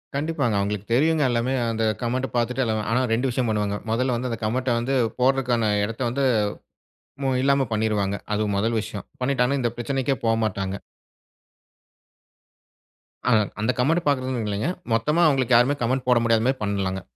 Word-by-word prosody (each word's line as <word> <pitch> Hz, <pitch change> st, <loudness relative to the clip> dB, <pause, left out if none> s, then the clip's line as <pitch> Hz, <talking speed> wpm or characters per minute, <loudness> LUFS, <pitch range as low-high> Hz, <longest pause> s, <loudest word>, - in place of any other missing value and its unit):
கண்டிப்பாங்க. 145 Hz, -6 st, 0 dB
அவங்களுக்கு 100 Hz, 0 st, -2 dB
தெரியுங்க 155 Hz, +4 st, +3 dB
எல்லாமே, 120 Hz, +2 st, 0 dB, 0.2 s
அந்த 115 Hz, 0 st, -1 dB, 0.2 s
கமெண்ட்ட 125 Hz, +2 st, -1 dB
பாத்துட்டு 125 Hz, +2 st, 0 dB, 0.3 s
ஆனா, 125 Hz, +3 st, +2 dB
2 125 Hz, +4 st, +1 dB
விஷயம் 120 Hz, -1 st, -1 dB
பண்ணுவாங்க. 105 Hz, -1 st, 0 dB, 0.2 s
மொதல்ல 125 Hz, +2 st, +1 dB
வந்து 125 Hz, +2 st, -3 dB
அந்த 115 Hz, -, -4 dB
கமெண்ட்ட 125 Hz, +2 st, 0 dB
வந்து 130 Hz, +3 st, -1 dB, 0.2 s
போடுறதற்கான 125 Hz, -4 st, +2 dB
இடத்தை 115 Hz, +4 st, -3 dB
வந்து 135 Hz, +3 st, 0 dB, 1.2 s
இல்லாம 140 Hz, 0 st, +3 dB
பண்ணிருவாங்க, 105 Hz, -2 st, 0 dB, 0.2 s
அது 105 Hz, +1 st, +1 dB
முதல் 115 Hz, +3 st, +1 dB
விஷயம். 105 Hz, -1 st, -7 dB, 0.2 s
பண்ணிட்டாங்கனா 130 Hz, +1 st, +1 dB
இந்த 120 Hz, -1 st, 0 dB
பிரச்சனைக்கே 135 Hz, +2 st, -1 dB
போமாட்டாங்க. 105 Hz, -4 st, 0 dB, 2.5 s
ஆ -, -, +3 dB, 0.3 s
அந்த 110 Hz, +4 st, +2 dB
கமெண்ட் 165 Hz, +7 st, +2 dB
பாக்கிறது 130 Hz, -4 st, 0 dB
இல்லைங்க. 105 Hz, +8 st, -1 dB, 0.2 s
மொத்தமா 150 Hz, +9 st, +2 dB
அவங்களுக்கு 130 Hz, -4 st, +2 dB
யாருமே 130 Hz, +4 st, +3 dB
கமெண்ட் 130 Hz, +2 st, -1 dB
போட 125 Hz, -, +5 dB
முடியாத 115 Hz, -1 st, +2 dB
மாதிரி 130 Hz, -1 st, 0 dB
பண்ணலாங்க. 95 Hz, -2 st, -2 dB
120 Hz, 145 wpm, -24 LUFS, 110-135 Hz, 2.5 s, போட